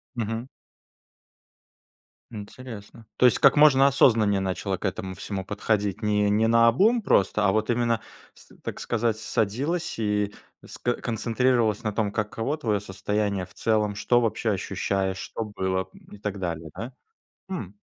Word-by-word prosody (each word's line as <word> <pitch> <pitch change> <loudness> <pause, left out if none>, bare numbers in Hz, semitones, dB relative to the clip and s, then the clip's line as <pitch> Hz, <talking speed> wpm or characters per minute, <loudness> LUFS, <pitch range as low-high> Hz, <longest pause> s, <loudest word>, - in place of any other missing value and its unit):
Мгм. 115 +2 -3 1.8
Интересно. 110 0 -10
То 125 - +4
есть 125 - +5
как 140 0 +6
можно 140 -2 +6
осознаннее 110 -7 +4
начала 95 0 -2
к - - -13
этому 95 0 -3
всему 95 +1 -5
подходить? 105 0 -1
Не 105 -1 +2
не 110 +2 +3
наобум 115 - +4
просто, 105 - +2
а 95 - +4
вот 110 +2 0
именно 115 -1 +1 0.3
с - - -19
так - - -5
сказать, 115 -2 0
садилась 125 - -1
и 105 -2 0 0.3
с - - -10
ко 120 - 0
концентрировалась 115 -1 0
на 105 -2 -2
том, 105 -2 0
каково 115 +8 -2
твое 105 -8 -1
состояние 100 0 -2
в - - -20
целом, 105 -2 0
что 120 +3 +2
вообще 115 -1 0
ощущаешь, 95 0 -1
что 115 - -5
было, 95 -2 -2
м, - - -15
и - - -10
так 100 -1 -4
далее, 80 -3 -4
да? 120 +3 -6 0.6
Хм. 105 - -5
110 Hz, 150 wpm, -25 LUFS, 100-120 Hz, 1.8 s, как